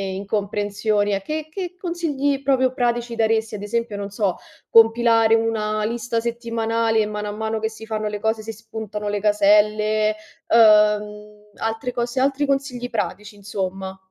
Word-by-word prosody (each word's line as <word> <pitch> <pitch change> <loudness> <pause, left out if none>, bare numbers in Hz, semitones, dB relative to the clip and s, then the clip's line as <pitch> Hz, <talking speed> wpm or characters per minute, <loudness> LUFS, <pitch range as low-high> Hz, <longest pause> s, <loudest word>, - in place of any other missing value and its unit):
incomprensioni. 205 +1 -1
A 195 - -1
che 310 +7 -4
che 360 0 -6
consigli 290 -6 -1
proprio 260 -1 +2
pratici 240 -2 -1
daresti? 220 -1 +1
Ad 200 - -7
esempio, 225 0 -2
non 200 0 -5
so, 200 -2 -1 0.3
compilare 225 0 +5
una 215 -1 0
lista 230 0 -2
settimanale 230 -1 -1
e 215 - +2
mano 210 0 -4
a - - -3
mano 220 +1 -3
che 220 0 -1
si 220 0 -11
fanno 215 -1 -3
le 210 0 -5
cose, 220 0 0
si 225 +1 -6
spuntano 220 -1 -7
le 205 -1 -2
caselle, 210 +1 +3 0.3
uhm, 210 -1 +3
altre 225 +3 -3
cose, 240 +2 -2
altri 275 +2 +1
consigli 270 -3 -2
pratici, 210 -1 -4
insomma. 190 -1 -5
220 Hz, 155 wpm, -22 LUFS, 210-235 Hz, 0.3 s, compilare